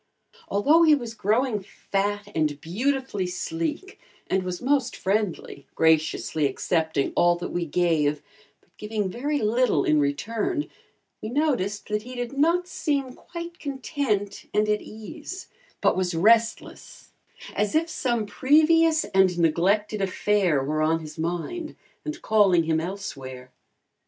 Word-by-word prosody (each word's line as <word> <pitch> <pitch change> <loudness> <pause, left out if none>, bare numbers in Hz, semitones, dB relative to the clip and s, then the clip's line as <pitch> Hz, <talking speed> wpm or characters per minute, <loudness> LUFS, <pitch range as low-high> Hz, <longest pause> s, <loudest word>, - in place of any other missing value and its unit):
Although 290 +12 +4
he 315 -2 +7
was 240 -5 -5
growing 220 +1 0
fat 205 +1 -3
and 150 -2 0
beautifully 220 - -1
sleek 180 - -4 0.3
and 190 - 0
was 180 -1 -4
most 260 -1 +1
friendly, 190 -8 -2
graciously 160 -1 +2
accepting 160 -2 -1
all 175 0 +4
that 175 - -6
we 175 -1 -2
gave, 150 -3 +1 0.4
but - - -35
giving 210 -3 -3
very 290 +7 -1
little 220 - +2
in 150 - +3
return, 225 - -1 0.5
we 215 - -4
noticed 245 -8 0
that 210 0 0
he 250 +3 -9
did 245 +1 -4
not 335 +5 +2
seem 280 -7 -2
quite 340 +3 -9
content 265 -8 -3
and 210 0 +3
at 210 0 +1
ease, 310 - -9 0.3
but - - +3
was 185 -2 -1
restless, 225 +6 +1 0.4
as 210 +3 0
if 325 +1 +2
some 240 -8 -1
previous 315 +7 +4
and 190 -2 +2
neglected 195 +6 +1
affair 190 -6 +1
were 155 +3 -1
on 160 +1 +2
his 155 0 -10
mind 175 - -3 0.3
and 305 0 -6
calling 200 -6 +4
him 160 0 +1
elsewhere. 135 -9 -6
210 Hz, 135 wpm, -25 LUFS, 170-265 Hz, 0.5 s, he